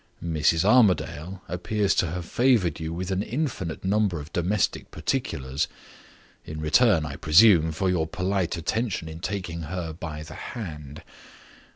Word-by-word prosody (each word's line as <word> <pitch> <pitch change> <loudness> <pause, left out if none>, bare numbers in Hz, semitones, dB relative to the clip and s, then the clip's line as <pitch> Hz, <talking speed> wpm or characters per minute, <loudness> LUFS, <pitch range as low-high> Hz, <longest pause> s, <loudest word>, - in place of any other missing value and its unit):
Mrs. 80 +1 +2
Armadale 95 -6 +2
appears 95 +4 0
to 90 - +1
have 90 +1 -4
favored 115 - +2
you 80 0 -4
with 90 +3 -4
an 95 +1 0
infinite 110 - -3
number 100 -3 +1
of 75 +3 -10
domestic 90 +4 0
particulars 65 +2 -2 0.8
in 75 0 -7
return, 80 +2 +4
I 70 -1 -6
presume, 80 0 +6
for 85 +5 -1
your 85 -4 +1
polite 95 0 -1
attention 95 +1 -2
in 80 0 -8
taking 90 -2 -4
her 80 0 -4
by 80 -2 -6
the - - -10
hand. 75 - -7
90 Hz, 145 wpm, -25 LUFS, 80-100 Hz, 0.8 s, presume